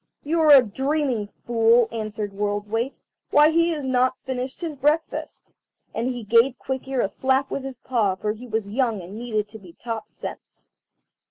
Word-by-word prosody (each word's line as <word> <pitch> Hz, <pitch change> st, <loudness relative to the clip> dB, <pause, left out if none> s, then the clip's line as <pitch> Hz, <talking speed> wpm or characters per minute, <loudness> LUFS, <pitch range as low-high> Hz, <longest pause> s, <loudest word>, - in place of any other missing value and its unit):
"You 325 Hz, +3 st, 0 dB
are 290 Hz, -4 st, +8 dB
dreaming, 265 Hz, -1 st, -1 dB, 0.2 s
fool," 230 Hz, 0 st, +4 dB
answered 215 Hz, -2 st, -4 dB
World's 205 Hz, +1 st, -2 dB
weight; 230 Hz, +5 st, -2 dB, 0.3 s
"why 300 Hz, +2 st, +6 dB
he 335 Hz, +1 st, +3 dB
has 300 Hz, -4 st, -3 dB
not 255 Hz, 0 st, +2 dB
finished 260 Hz, 0 st, -4 dB
his 330 Hz, -4 st, -4 dB
breakfast." 295 Hz, +4 st, -1 dB, 0.4 s
And 235 Hz, -, -1 dB
he 245 Hz, -2 st, -3 dB
gave 235 Hz, +4 st, +4 dB
Quick 265 Hz, 0 st, -4 dB
ear 265 Hz, -2 st, 0 dB
a -, -, +1 dB
slap 265 Hz, +6 st, 0 dB
with 275 Hz, -, -3 dB
his 265 Hz, -2 st, -6 dB
paw, 230 Hz, -7 st, 0 dB
for 210 Hz, +3 st, -2 dB
he 230 Hz, +4 st, -8 dB
was 220 Hz, -2 st, -2 dB
young 225 Hz, 0 st, 0 dB
and 185 Hz, +4 st, -9 dB
needed 215 Hz, -3 st, -2 dB
to 220 Hz, -, -10 dB
be 180 Hz, -4 st, -14 dB
taught 225 Hz, +1 st, -6 dB
sense. -, -, -9 dB
245 Hz, 180 wpm, -24 LUFS, 215-270 Hz, 0.4 s, are